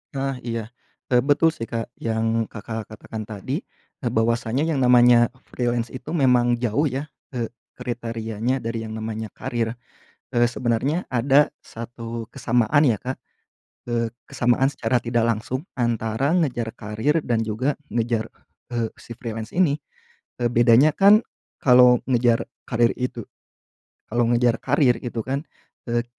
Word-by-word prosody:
Nah 135 Hz, -1 st, -2 dB
iya. 115 Hz, -1 st, -1 dB, 0.5 s
Eee, 125 Hz, -, +6 dB
betul 145 Hz, +4 st, +4 dB
sih 115 Hz, -, -5 dB
Kak 115 Hz, -1 st, -2 dB
yang 115 Hz, 0 st, 0 dB
Kakak 110 Hz, 0 st, -6 dB
katakan 110 Hz, 0 st, -7 dB
tadi, 130 Hz, -, -4 dB, 0.4 s
eee, 120 Hz, -, 0 dB
bahwasanya 115 Hz, +3 st, +1 dB
yang 155 Hz, -4 st, 0 dB
namanya 120 Hz, -1 st, +6 dB, 0.2 s
freelance 120 Hz, -1 st, -1 dB
itu 130 Hz, -, -7 dB
memang 125 Hz, -4 st, +4 dB
jauh 125 Hz, +6 st, +1 dB
ya, 135 Hz, +3 st, -3 dB, 0.3 s
eee, 120 Hz, -2 st, -1 dB, 0.3 s
kriterianya 115 Hz, 0 st, -3 dB
dari 115 Hz, 0 st, -3 dB
yang -, -, -7 dB
namanya 110 Hz, 0 st, -4 dB
karier. 115 Hz, -1 st, -3 dB, 0.6 s
Eee, 120 Hz, -1 st, +4 dB
sebenernya 125 Hz, +7 st, 0 dB
ada 135 Hz, +4 st, +4 dB, 0.2 s
1 115 Hz, 0 st, -7 dB
kesamaan 125 Hz, +6 st, +2 dB
ya 115 Hz, -, +3 dB
Kak, 130 Hz, +1 st, -4 dB, 0.7 s
eee, 115 Hz, -1 st, 0 dB, 0.2 s
kesamaan 120 Hz, +2 st, +2 dB
secara 130 Hz, -2 st, 0 dB
tidak 120 Hz, -1 st, +1 dB
langsung 120 Hz, +5 st, -2 dB, 0.2 s
antara 120 Hz, +5 st, 0 dB
ngejar 125 Hz, -9 st, 0 dB
karier 110 Hz, +9 st, 0 dB
dan 115 Hz, -4 st, 0 dB
juga 130 Hz, +7 st, 0 dB, 0.2 s
ngejar, 115 Hz, -1 st, 0 dB, 0.5 s
eee, 115 Hz, -2 st, 0 dB
si 115 Hz, -, -10 dB
freelance 115 Hz, -1 st, -5 dB
ini. 160 Hz, -5 st, +3 dB, 0.6 s
Eee, 120 Hz, -, +2 dB
bedanya 120 Hz, +5 st, +6 dB
kan 205 Hz, +3 st, +6 dB, 0.4 s
kalau 125 Hz, -1 st, +7 dB
ngejar 120 Hz, -2 st, +3 dB, 0.2 s
karier 120 Hz, 0 st, +3 dB
itu 125 Hz, 0 st, -3 dB, 0.9 s
kalau 120 Hz, +2 st, +1 dB
ngejar 120 Hz, -1 st, +3 dB
karier 125 Hz, -5 st, +3 dB
gitu 120 Hz, -2 st, -4 dB
kan, 135 Hz, +3 st, -2 dB, 0.5 s
eee, 120 Hz, 0 st, +1 dB
120 Hz, 140 wpm, -23 LUFS, 115-130 Hz, 0.9 s, kalau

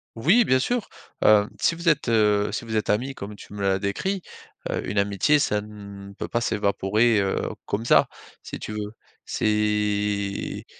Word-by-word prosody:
Oui, 175 Hz, -, +4 dB
bien 130 Hz, -6 st, +3 dB
sûr. 240 Hz, -, -1 dB, 0.4 s
Hem, 105 Hz, -1 st, +5 dB
si -, -, +2 dB
vous 170 Hz, +1 st, 0 dB
êtes, 150 Hz, -4 st, +1 dB
heu, 105 Hz, -3 st, +3 dB
si -, -, -4 dB
vous 110 Hz, -1 st, -4 dB
êtes 110 Hz, -, +1 dB
amies 130 Hz, +6 st, -1 dB
comme 100 Hz, +1 st, -7 dB
tu -, -, -14 dB
me 105 Hz, -, -6 dB
l'as 95 Hz, -1 st, +2 dB
décrit, 180 Hz, -, -2 dB, 0.5 s
heu, -, -, -3 dB
une 100 Hz, +1 st, 0 dB
amitié 100 Hz, +9 st, +2 dB
ça 105 Hz, -6 st, +1 dB
ne 100 Hz, -1 st, -10 dB
peut -, -, -6 dB
pas 120 Hz, -, -1 dB
s'évaporer, 105 Hz, +1 st, +2 dB
heu, 95 Hz, -1 st, 0 dB, 0.2 s
comme 105 Hz, +2 st, -2 dB
ça, -, -, +5 dB, 0.4 s
si -, -, -7 dB
tu 105 Hz, -, -6 dB
veux. 105 Hz, -1 st, -4 dB, 0.3 s
C'est 105 Hz, -1 st, -1 dB
105 Hz, 180 wpm, -24 LUFS, 100-120 Hz, 0.5 s, Hem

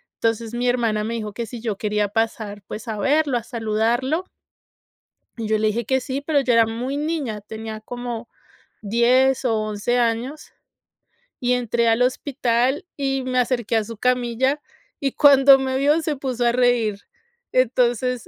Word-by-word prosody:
Entonces, 230 Hz, 0 st, -1 dB
mi 245 Hz, +1 st, -1 dB
hermana 230 Hz, -4 st, 0 dB
me 230 Hz, +2 st, -3 dB
dijo 215 Hz, -2 st, -5 dB
que 235 Hz, +2 st, -4 dB
si 230 Hz, +1 st, -8 dB
yo 220 Hz, -4 st, -3 dB
quería 210 Hz, 0 st, 0 dB
pasar, 215 Hz, -1 st, -2 dB
pues, 215 Hz, -, -7 dB
a 220 Hz, -2 st, -3 dB
verlo, 280 Hz, +4 st, +2 dB
a 235 Hz, -, -5 dB
saludarlo 235 Hz, +8 st, -1 dB, 1.1 s
y 225 Hz, -2 st, -4 dB
yo 215 Hz, 0 st, +2 dB
le 215 Hz, 0 st, +1 dB
dije 220 Hz, +1 st, -1 dB
que 265 Hz, +1 st, +1 dB
sí, 265 Hz, +2 st, -4 dB
pero 290 Hz, 0 st, +1 dB
yo 250 Hz, -2 st, +1 dB
era 230 Hz, -1 st, +5 dB
muy 240 Hz, +5 st, -4 dB
niña, 290 Hz, -8 st, -2 dB
tenía 220 Hz, +1 st, -7 dB
como 240 Hz, 0 st, -6 dB, 0.5 s
10 245 Hz, +5 st, +3 dB
o 235 Hz, -3 st, +2 dB
11 215 Hz, +3 st, -1 dB
años 240 Hz, +5 st, -2 dB, 0.9 s
y 250 Hz, 0 st, +1 dB
entré 235 Hz, -1 st, 0 dB
al 225 Hz, +1 st, +3 dB
hospital 255 Hz, +1 st, 0 dB
y 270 Hz, -1 st, -1 dB
me 255 Hz, 0 st, 0 dB
acerqué 240 Hz, -2 st, 0 dB
a 220 Hz, -, +1 dB
su 230 Hz, +1 st, -9 dB
camilla, 250 Hz, +4 st, +1 dB, 0.4 s
y 275 Hz, -2 st, -1 dB
cuando 275 Hz, -1 st, +7 dB
me 265 Hz, 0 st, -1 dB
vio 295 Hz, +4 st, +3 dB
se 310 Hz, -2 st, -2 dB
puso 255 Hz, -3 st, -2 dB
a 235 Hz, -, +4 dB
reír. 235 Hz, -4 st, +1 dB, 0.5 s
Entonces, 250 Hz, -1 st, +1 dB
240 Hz, 165 wpm, -22 LUFS, 225-260 Hz, 1.1 s, cuando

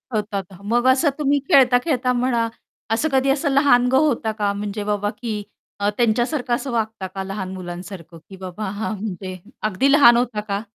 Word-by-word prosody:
होतात, 205 Hz, -2 st, -2 dB
ह 185 Hz, -, -15 dB
मग 240 Hz, +4 st, +1 dB
असं 280 Hz, +4 st, +3 dB
तुम्ही 285 Hz, -1 st, +2 dB
खेळता-खेळता 250 Hz, 0 st, +4 dB
म्हणा, 240 Hz, -2 st, +1 dB, 0.4 s
असं 245 Hz, +8 st, +1 dB
कधी 270 Hz, 0 st, +2 dB
असं 285 Hz, +2 st, +1 dB
लहानगं 265 Hz, -2 st, +4 dB
होता 265 Hz, -7 st, +1 dB
का? 205 Hz, -1 st, +1 dB
म्हणजे 205 Hz, +1 st, -4 dB
बाबा 205 Hz, 0 st, -1 dB
की 220 Hz, -3 st, -3 dB, 0.4 s
अ, 205 Hz, +1 st, +1 dB
त्यांच्यासारखं 240 Hz, +3 st, +1 dB
असं 270 Hz, +1 st, -5 dB
वागता 220 Hz, -4 st, -2 dB
का, 190 Hz, +1 st, -6 dB
लहान 190 Hz, -1 st, -5 dB
मुलांसारखं, 175 Hz, -1 st, -8 dB
की 190 Hz, -, -10 dB
बाबा 190 Hz, +3 st, -6 dB
हां 210 Hz, +3 st, -3 dB
म्हणजे 190 Hz, -2 st, -6 dB, 0.3 s
अगदी 260 Hz, +8 st, +2 dB
लहान 240 Hz, -5 st, +7 dB
होता 240 Hz, -3 st, -1 dB
का? 200 Hz, +1 st, -1 dB
225 Hz, 175 wpm, -21 LUFS, 200-260 Hz, 0.4 s, लहान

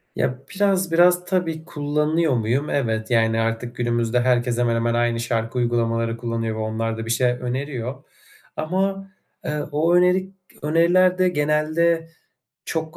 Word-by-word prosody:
Ya, 125 Hz, 0 st, -1 dB, 0.2 s
biraz 190 Hz, -3 st, +1 dB
biraz 175 Hz, +1 st, +4 dB
tabii 165 Hz, -4 st, -2 dB
kullanıyor 150 Hz, +1 st, 0 dB
muyum? 120 Hz, +5 st, 0 dB
Evet. 110 Hz, -4 st, -1 dB
Yani, 115 Hz, -1 st, +2 dB
artık 115 Hz, +1 st, -2 dB
günümüzde 120 Hz, 0 st, 0 dB
herkes 120 Hz, -1 st, +1 dB
hemen 120 Hz, -1 st, +1 dB
hemen 115 Hz, 0 st, 0 dB
aynı 120 Hz, 0 st, +1 dB
şarkı 115 Hz, 0 st, -2 dB
uygulamaları 115 Hz, -1 st, 0 dB
kullanıyor 115 Hz, -1 st, -3 dB
ve -, -, -5 dB
onlar 110 Hz, +1 st, -2 dB
da 115 Hz, -, -5 dB
bir 115 Hz, -, -2 dB
şey 125 Hz, +1 st, +2 dB
öneriyor 125 Hz, +1 st, -4 dB, 0.5 s
ama, 195 Hz, +4 st, -2 dB, 0.4 s
ııı, 150 Hz, -1 st, -3 dB
o 160 Hz, +4 st, +2 dB
öneri 180 Hz, +1 st, +3 dB, 0.3 s
öneriler 175 Hz, +4 st, +3 dB
de 185 Hz, 0 st, +3 dB
genelde 155 Hz, +2 st, +1 dB, 0.6 s
çok 160 Hz, -1 st, -4 dB
135 Hz, 145 wpm, -22 LUFS, 115-165 Hz, 0.6 s, biraz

